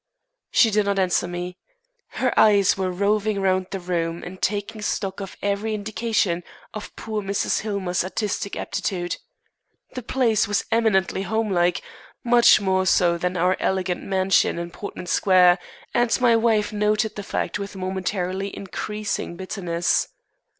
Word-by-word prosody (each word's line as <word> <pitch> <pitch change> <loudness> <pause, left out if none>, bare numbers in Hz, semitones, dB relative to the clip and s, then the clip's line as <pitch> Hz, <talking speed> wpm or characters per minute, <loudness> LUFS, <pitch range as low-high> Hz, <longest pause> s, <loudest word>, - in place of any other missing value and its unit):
She 225 - +4
did 210 -1 +2
not 200 -1 +1
answer 185 -2 +1
me. 175 +1 -6 0.5
Her - - 0
eyes 205 -3 +5
were 190 -1 -1
roving 205 +2 0
round 185 -1 +1
the 195 - -4
room 170 -2 -2
and 185 +1 -9
taking 205 +1 -2
stock 195 -2 -2
of 195 -1 -7
every 205 +2 -1
indication 210 -4 -1 0.3
of 215 - -8
poor 215 -1 -4
Mrs. 200 0 0
Hillmer's 195 -5 -1
artistic 200 +1 -3
aptitude. 175 -2 -3 0.8
The 255 - -5
place 230 -3 +1
was 205 0 0
eminently 215 -5 +2
home 220 +2 -1
like, 175 -1 +1 0.4
much 240 -2 +6
more 190 -2 +1
so 170 -1 +3
than 180 +1 -1
our 180 +2 +2
elegant 185 -2 -1
mansion 190 -2 +2
in 170 0 -5
Portman 190 0 -7
Square, 180 0 +4 0.3
and 240 +1 +2
my 240 -2 +4
wife 220 -2 +2
noted 210 +1 +1
the 205 - -4
fact 200 - -3
with 200 0 -6
momentarily 190 +1 -3
increasing 205 -1 -4
bitterness. 180 -2 -1
195 Hz, 145 wpm, -23 LUFS, 180-210 Hz, 0.8 s, much